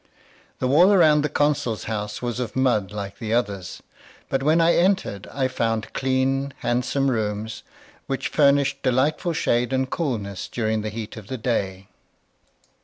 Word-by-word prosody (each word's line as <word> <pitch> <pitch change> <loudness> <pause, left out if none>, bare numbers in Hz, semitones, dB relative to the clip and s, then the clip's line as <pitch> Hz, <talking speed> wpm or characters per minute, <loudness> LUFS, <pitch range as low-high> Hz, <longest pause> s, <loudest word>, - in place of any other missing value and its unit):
The - - -2
wall 170 +9 +6
around 155 -6 +5
the 150 - -1
consul's 145 -6 0
house 105 0 -4
was 120 0 -2
of 120 -3 -4
mud 120 -7 +1
like 100 -1 -6
the 115 -1 -1
others; 100 -6 -3 0.5
but 135 - 0
when 155 +4 +3
I 165 +1 +5
entered 175 - +1
I 135 -2 0
found 115 -4 -2
clean, 135 +1 0
handsome 125 +3 0
rooms, 105 -1 -3 0.5
which 135 -1 -2
furnished 140 -1 +3
delightful 135 +7 +1
shade 120 -4 +1
and 130 0 +1
coolness 110 - -3
during 110 -2 -1
the 110 - -3
heat 110 +2 -7
of 105 -3 -10
the 130 - -4
day. 95 -5 -2
125 Hz, 155 wpm, -23 LUFS, 110-140 Hz, 0.5 s, wall